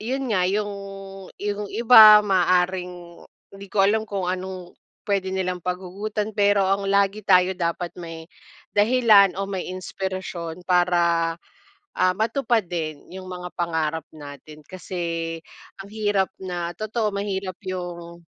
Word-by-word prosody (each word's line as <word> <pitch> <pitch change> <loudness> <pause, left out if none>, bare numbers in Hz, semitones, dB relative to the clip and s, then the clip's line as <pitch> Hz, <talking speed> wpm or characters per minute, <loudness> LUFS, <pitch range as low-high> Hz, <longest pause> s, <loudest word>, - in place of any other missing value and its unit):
yun 260 +5 -3
nga, 185 -2 +2
yung 205 +2 -1 0.7
yung 205 0 -3
iba 220 -2 +9
maaaring 180 -2 0 0.3
hindi 195 0 -11
ko 205 - -5
alam, 215 +2 +2
kung 195 -2 -3
anong 185 -1 -5 0.4
pwede 190 -2 0
nilang 185 -1 -2
paghugutan 190 +4 -4
pero 205 -1 +2
ang 195 0 0
lagi 200 +1 +1
tayo 180 -1 +5
dapat 170 0 -2
may, 165 -1 -9 0.4
dahilan 210 -3 +5
o 195 - -3
may 190 -2 -4
inspirasyon 185 -2 -5
para, 175 -2 +2 0.6
ah, 185 0 +2
matupad 230 -2 0
din 155 -4 -5
yung 185 0 -8
mga 180 -1 -7
pangarap 160 -2 -1
natin. 150 0 -12
Kasi 170 -3 -4 0.4
ang 195 - -9
hirap 205 -3 +1 0.2
na 175 -2 -4
totoo 215 +2 -2
mahirap 195 -2 -3
yung 175 -2 -6
185 Hz, 130 wpm, -23 LUFS, 175-205 Hz, 0.7 s, iba